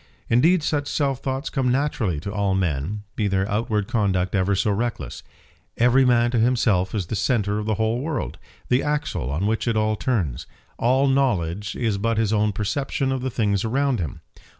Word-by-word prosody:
Indeed 160 Hz, +8 st, +4 dB
such 145 Hz, -2 st, -1 dB
self 140 Hz, -3 st, 0 dB
thoughts 135 Hz, +2 st, -3 dB
come 130 Hz, -3 st, +1 dB
naturally 125 Hz, -, 0 dB
to 100 Hz, +4 st, -5 dB
all 100 Hz, -2 st, +1 dB
men, 90 Hz, +3 st, -1 dB
be 105 Hz, -, 0 dB
their 95 Hz, 0 st, 0 dB
outward 105 Hz, -1 st, -1 dB
conduct 95 Hz, -6 st, 0 dB
ever 100 Hz, 0 st, +2 dB
so 105 Hz, +2 st, +1 dB
reckless. 115 Hz, +3 st, -3 dB, 0.6 s
Every 125 Hz, +3 st, +4 dB
man 120 Hz, -1 st, +3 dB
to 120 Hz, -, +1 dB
himself 110 Hz, -6 st, +2 dB
is 100 Hz, -4 st, -1 dB
the 110 Hz, -, -4 dB
centre 105 Hz, -2 st, 0 dB
of 105 Hz, -, -4 dB
the 110 Hz, -, +1 dB
whole 110 Hz, +3 st, 0 dB
world; 150 Hz, -4 st, -3 dB, 0.3 s
the 125 Hz, +2 st, +2 dB
axle 150 Hz, -, -2 dB
on 80 Hz, +8 st, -1 dB
which 110 Hz, +3 st, 0 dB
it 115 Hz, -2 st, +1 dB
all 110 Hz, 0 st, +1 dB
turns. 100 Hz, -, -2 dB, 0.3 s
All 130 Hz, +3 st, +3 dB
knowledge 105 Hz, -8 st, 0 dB
is 110 Hz, -5 st, -1 dB
but 115 Hz, +2 st, 0 dB
his 110 Hz, -1 st, +1 dB
own 105 Hz, 0 st, +2 dB
perception 135 Hz, +6 st, -1 dB
of 130 Hz, -1 st, -1 dB
the 130 Hz, -, -1 dB
things 105 Hz, -5 st, 0 dB
around 130 Hz, +2 st, +1 dB
him. 80 Hz, -6 st, -4 dB
110 Hz, 190 wpm, -23 LUFS, 100-130 Hz, 0.6 s, Indeed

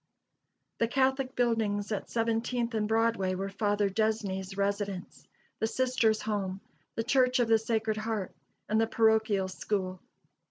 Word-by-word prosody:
The 230 Hz, -, +3 dB
Catholic 265 Hz, +1 st, +1 dB
buildings 220 Hz, -4 st, 0 dB
at 210 Hz, -, -3 dB
Seventeenth 230 Hz, +1 st, 0 dB
and 215 Hz, -1 st, 0 dB
Broadway 225 Hz, -4 st, +1 dB
were 195 Hz, +1 st, -3 dB
Father 205 Hz, 0 st, +1 dB
Desney's 195 Hz, -2 st, -1 dB
residence, 200 Hz, -2 st, -3 dB, 0.3 s
the 220 Hz, -, +1 dB
Sisters' 245 Hz, -3 st, +1 dB
Home, 200 Hz, -3 st, -2 dB, 0.4 s
the 225 Hz, -, -1 dB
Church 255 Hz, +1 st, +3 dB
of 240 Hz, -, +3 dB
the 225 Hz, 0 st, +5 dB
Sacred 220 Hz, -1 st, -1 dB
Heart, 215 Hz, -3 st, -3 dB, 0.3 s
and 215 Hz, +1 st, +2 dB
the 225 Hz, -, +2 dB
parochial 220 Hz, -4 st, +3 dB
school. 185 Hz, -1 st, -3 dB
220 Hz, 135 wpm, -30 LUFS, 200-230 Hz, 0.4 s, the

